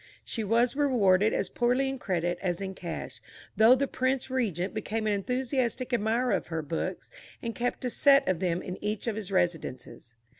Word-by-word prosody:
She 225 - -3
was 235 +5 +2
rewarded 220 -8 +3
as 195 - 0
poorly 250 +6 +1
in 270 -1 -3
credit 175 -4 -1
as 175 -3 -1
in 190 -1 -4
cash, 170 -3 -7 0.3
though 220 +4 +7
the 275 +2 +1
Prince 260 0 -1
Regent 200 -8 -1
became 220 +1 -3
an 210 - +2
enthusiastic 250 +3 -1
admirer 235 +3 +1
of - - 0
her 160 -1 -3
books, 160 +2 -4 0.3
and 230 -1 -4
kept 245 +2 -2
a - - +1
set 275 +1 +5
of 185 -3 +1
them 175 -2 -1
in 185 - -7
each 210 0 -2
of 230 -3 -1
his 205 -3 -5
residences. 170 -9 -2
220 Hz, 185 wpm, -28 LUFS, 185-250 Hz, 0.3 s, though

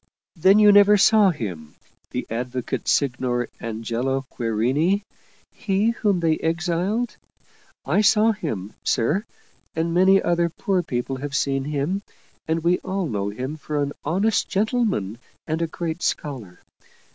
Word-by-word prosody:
" - - -70
Then 190 +4 +5
you 210 -1 +7
never 205 +1 +7
saw 210 0 +5
him, 90 - -5 0.3
the - - -4
Advocate 125 +1 -4
Signer 125 -3 0
Angelo 115 +4 -2
Querini, 130 - +1 0.5
he 210 0 0
whom 205 -6 0
they 160 -1 +1
exiled? 175 +8 -1 0.7
I - - +2
saw 215 +2 +4
him, 110 - -5
sir, 150 - +1 0.5
and 165 +1 -1
many 190 +2 +5
other 170 -1 +1
poor 185 +2 -1
people 130 -3 -3
have 140 +1 -5
seen 135 -1 0
him, 150 +7 -1 0.5
and 160 0 -1
we 175 +1 +2
all 190 0 -3
know 100 -8 -2
him 130 +8 -5
for 150 -1 -3
an 145 0 -1
honest 195 +8 +1
gentleman 200 - 0 0.3
and 160 +1 -2
a 165 - +1
great 165 +1 -4
scholar. 120 -12 -4
160 Hz, 140 wpm, -23 LUFS, 125-195 Hz, 0.7 s, you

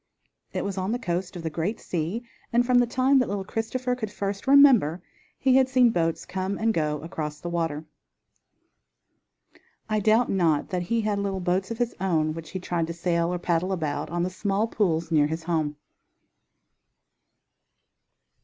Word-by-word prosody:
It - - -3
was 195 -1 -3
on 185 +3 -1
the 240 - 0
coast 180 -4 -3
of 170 - -6
the 160 - -3
great 175 +8 -2
sea, 175 +7 -3 0.3
and 240 +1 +3
from 250 0 +4
the 245 - +3
time 260 +3 +3
that 250 - 0
little 200 -1 -2
Christopher 250 +5 -2
could 235 -4 -4
first 200 +1 -4
remember 250 - +6 0.3
he 260 -1 +4
had 260 -1 +4
seen 255 -2 +5
boats 165 -4 -1
come 190 +1 -3
and 225 0 +1
go 150 -3 -1
across 150 -3 -5
the 175 - -5
water. 165 -3 -2 2.0
I 215 -1 +1
doubt 220 +4 +3
not 165 -6 +1
that 180 -1 -1
he 225 +6 0
had 210 -1 -1
little 195 -1 -2
boats 185 +1 0
of 230 - -4
his 240 -1 -1
own 160 -5 +1
which 160 -1 -8
he 185 - -5
tried 175 -2 -2
to 170 - -4
sail, 170 0 0
or 180 - -1
paddle 175 +1 0
about 155 -5 -2
on 175 +1 -1
the 185 - -2
small 200 +2 0
pools 170 -7 0
near 150 -2 +4
his 160 +2 -4
home. 160 -3 -1
185 Hz, 180 wpm, -26 LUFS, 165-225 Hz, 2.0 s, remember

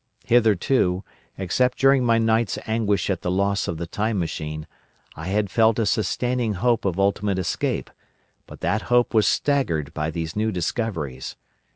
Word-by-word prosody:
Hitherto, 110 -4 +2 0.3
except 125 +7 0
during 135 -1 +4
my 115 -1 +3
night's 115 0 +1
anguish 110 -3 0
at 95 - -2
the - - -2
loss 100 +2 0
of 85 - -3
the 85 - -4
Time 105 +5 -2
Machine, 75 -3 -4 0.5
I 80 +3 -7
had 100 0 0
felt 110 0 +3
a 115 - +1
sustaining 115 +3 0
hope 115 +3 +1
of 95 -1 -1
ultimate 100 0 +1
escape, 90 -3 -2 0.6
but - - -12
that 110 - 0
hope 120 0 +3
was 110 -2 +4
staggered 85 - 0
by 75 0 -2
these 80 +1 -4
new 110 +1 0
discoveries. 80 - -3
105 Hz, 160 wpm, -23 LUFS, 90-115 Hz, 0.6 s, during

